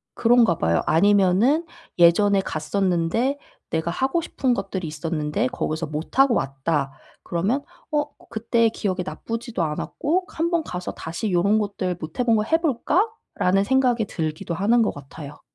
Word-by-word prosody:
그런가 230 -7 +4
봐요. 85 +1 +1
아니면은 205 - +3 0.3
예전에 195 +4 +5
갔었는데 185 - 0 0.3
내가 160 +1 -1
하고 265 - 0
싶은 260 -5 -1
것들이 195 -5 -3
있었는데 155 +7 -2
거기서 165 -10 -3
못하고 205 - +1
왔다 135 +1 -1 0.3
그러면 205 +12 -1 0.3
어 295 -1 +1 0.2
그때 230 0 +1
기억이 190 -4 -2
나쁘지도 230 -1 -4
않았고 295 - -1
한번 335 -2 0
가서 180 -9 -5
다시 165 +7 -5
이런 195 +4 +3
것들 190 -3 -2
'못해 160 +10 -3
본 230 -2 +4
거 210 - +2
해볼까?'라는 315 - 0
생각이 250 -1 +2
들기도 160 -2 -4
하는 215 +7 +3
것 220 - +1
같아요. 145 +1 -10
200 Hz, 325 characters per minute, -23 LUFS, 165-245 Hz, 0.3 s, 예전에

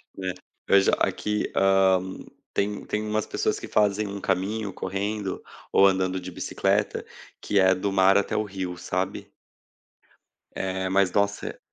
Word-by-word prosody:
É, 95 -1 -3 0.3
veja 100 0 +5
aqui, 105 0 -1
hã, 95 -1 +4 0.5
tem 100 0 -1
tem 105 0 -2
umas 110 0 0
pessoas - - -1
que - - -7
fazem 105 0 +2
um 100 0 -5
caminho 100 +2 -1
correndo, 100 +1 -3 0.3
ou 100 - +6
andando 95 -1 +2
de 90 0 -8
bicicleta, - - -1 0.4
que 100 - +1
é 95 0 +5
do 100 +2 -2
mar 95 0 +5
até 100 - 0
o 110 - +1
rio 95 -3 -5
sabe. 95 +3 -3 1.2
Eh, 95 0 -2
mas 95 -1 +3
nossa, 100 0 -1
95 Hz, 145 wpm, -25 LUFS, 95-100 Hz, 1.2 s, ou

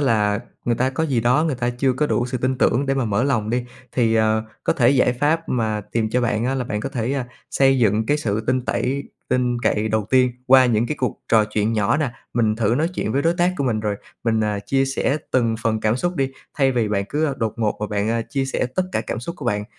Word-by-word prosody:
là 105 -6 +2 0.2
người 120 - +1
ta 130 +3 +1
có 160 +5 -1
gì 130 -5 +1
đó 125 +7 +3
người 150 - 0
ta 120 -1 -1
chưa 130 +2 +1
có 150 +4 0
đủ 120 - 0
sự 125 0 -3
tin 130 +1 -1
tưởng 135 +5 +2
để 135 - +1
mà 135 -3 0
mở 105 +1 0
lòng 110 -6 0
đi. 120 +1 0 0.3
Thì, 115 -3 +2
ờ, 110 0 +2 0.2
có - - +3
thể 120 0 +3
giải 125 -2 +3
pháp 150 +6 0
mà 110 -3 0
tìm 110 -2 0
cho 125 - +1
bạn 115 -1 0
á 130 +2 0
là 130 -2 -1
bạn 105 -2 -3
có - - -3
thể, 120 +2 -2
ơ, 135 -3 -1 0.3
xây 135 -1 +3
dựng 110 -1 +2
cái 145 - +2
sự 110 -7 -1
tin 130 -1 +1
tẩy 135 +3 -1 0.3
tin 125 -1 +1
cậy 110 +1 +1
đầu 110 -1 0
tiên 130 -1 +4
qua 130 0 +7
những 115 -1 +2
cái 150 - -3
cuộc 125 -4 -2
trò 110 -2 +5
chuyện 105 +1 -1
nhỏ 105 +4 +2
nè. 150 -5 0 0.2
Mình 110 -2 +2
thử 115 0 +1
nói 160 +5 +1
chuyện 110 - -2
với 140 +1 +1
đối 165 +1 +2
tác 175 +1 +2
của 140 - -1
mình, 110 -4 0
rồi 105 -1 -2 0.3
mình, 110 -1 +2
ờ, 105 -1 0
chia 135 0 +2
sẻ 135 +1 0
từng 115 -3 +2
phần 110 -1 0
cảm 110 +2 +1
xúc 175 +6 -2
đi 135 -2 0 0.3
thay 135 -1 +3
vì 115 -3 0
bạn 100 -1 0
cứ 150 -1 0
đột 110 -3 -1
ngột 110 -2 0
và 105 - -1
bạn, 105 +1 -1
à, 115 0 0
chia 135 +2 -2
sẻ 135 - -1
tất 185 - +2
cả - - +1
cảm 115 - -4
xúc 170 +8 -5
của 140 - -7
bạn, 105 -2 0
120 Hz, 270 wpm, -21 LUFS, 110-135 Hz, 0.3 s, qua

